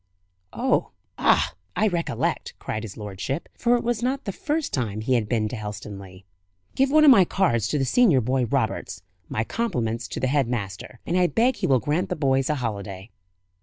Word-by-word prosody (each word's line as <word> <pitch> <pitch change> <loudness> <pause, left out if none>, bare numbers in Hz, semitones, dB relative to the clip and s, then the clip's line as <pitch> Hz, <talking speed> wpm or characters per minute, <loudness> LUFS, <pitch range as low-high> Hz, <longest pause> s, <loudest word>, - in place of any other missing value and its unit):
"Oh, - - +1 0.3
ah, - - +3 0.2
I 215 - +3
recollect," 175 -4 -2
cried 110 - -4
his 110 -3 -8
lordship 105 - -4
for 240 0 +2
it - - -4
was 240 -1 -1
not 265 +3 -1
the 200 - -2
first 300 - -2
time 110 -5 -2
he 130 +4 0
had 110 -4 +1
been 110 -3 +1
to 125 - -5
Helstonleigh. 100 -3 -8 0.5
"Give 270 0 +2
one 305 +2 +5
of 285 - +9
my 200 -7 +7
cards 120 - +1
to 150 - 0
the 135 - +1
senior 180 - +4
boy, 125 +1 0
Roberts. 110 -7 -2 0.3
My 110 - -1
compliments 115 - -2
to - - -5
the - - 0
head 135 -1 +2
master, 110 0 -5
and 170 - -1
I 180 - +4
beg 235 +6 +2
he - - -1
will 130 -2 +4
grant 150 +8 -1
the - - -1
boys 135 -2 +1
a 150 - +2
holiday." 100 -5 -5
130 Hz, 200 wpm, -24 LUFS, -, 0.5 s, of